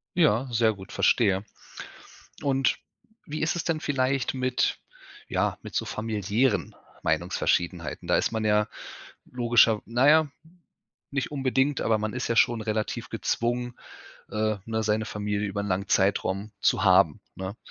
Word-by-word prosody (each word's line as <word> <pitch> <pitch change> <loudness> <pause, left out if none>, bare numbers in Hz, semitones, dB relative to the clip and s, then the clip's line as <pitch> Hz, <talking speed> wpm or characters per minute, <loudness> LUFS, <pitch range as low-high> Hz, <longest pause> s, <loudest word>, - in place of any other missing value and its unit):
Ja, 135 -7 +3
sehr 115 -1 +3
gut, 95 -1 -12
verstehe. 100 -4 +2 1.0
Und 135 -2 +1 0.5
wie 150 +1 -4
ist 155 - +1
es 170 - -2
denn 165 -2 -1
vielleicht 135 -2 0
mit 130 0 0 0.5
ja, - - 0
mit - - -10
so - - 0
familiären 110 -1 -1 0.3
Meinungsverschiedenheiten? 85 -3 -1
Da - - +4
ist - - 0
man 110 -1 -2
ja 105 0 +3 0.7
logischerw 120 -3 +4
naja, 145 +7 +4 0.8
nicht 140 0 -2
unbedingt, 135 0 +1
aber 110 -1 +2
man 105 0 -3
ist 130 - -3
ja 115 - 0
schon 115 0 +3
relativ 110 0 -3
gezwungen, 120 +1 -2 0.6
äh, 110 0 0
ne, 110 -1 -2
seine 110 +1 0
Familie 105 -1 -2
über 100 +1 -3
'n 100 - -3
langen 95 +1 -1
Zeitraum 100 +1 +1
zu - - +2
haben, - - +4 0.2
ne? 95 +3 -5
110 Hz, 140 wpm, -26 LUFS, 105-130 Hz, 1.0 s, Da